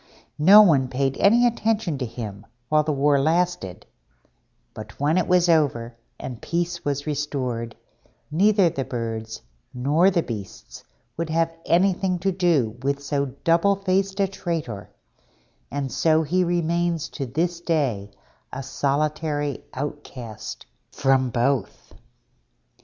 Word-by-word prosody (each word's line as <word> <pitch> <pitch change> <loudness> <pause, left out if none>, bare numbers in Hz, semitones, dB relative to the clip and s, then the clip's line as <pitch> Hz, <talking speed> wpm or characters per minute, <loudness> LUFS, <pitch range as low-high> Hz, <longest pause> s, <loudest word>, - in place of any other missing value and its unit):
No 200 +7 +9
one 140 -9 +3
paid 135 +1 -1
any 235 +5 +5
attention 220 - 0
to 125 - -2
him 110 -4 -8 0.2
while 155 0 +4
the 155 0 -1
war 140 0 +3
lasted: 160 - -1 0.9
but 110 -1 -10
when 150 +3 +2
it 185 - +1
was 180 -1 +3
over, 135 -8 +1 0.2
and 125 -4 -7
peace 170 0 -2
was 145 0 -2
restored, 130 -6 -3 0.6
neither 195 +3 +4
the 140 -4 -2
Birds 115 -3 -5 0.3
nor 150 +9 +3
the 175 -4 +1
Beasts 105 -5 -8 0.3
would 165 0 -3
have 165 +1 +1
anything 185 +1 +2
to 195 +2 0
do 155 - +1
with 140 +1 -1
so 140 0 -1 0.2
double 170 +4 +3
faced 195 0 -1
a 195 - +3
traitor, 165 - -5 0.8
and 140 -1 -3
so 160 -1 +2
he 180 +5 +1
remains 170 -1 0
to 135 - -5
this 170 +7 -2
day 135 - -1 0.4
a 135 - -5
solitary 145 +1 -1
outcast 130 -6 -7 0.2
from 135 -2 +1
both. 120 0 -1
150 Hz, 130 wpm, -23 LUFS, 130-175 Hz, 0.9 s, No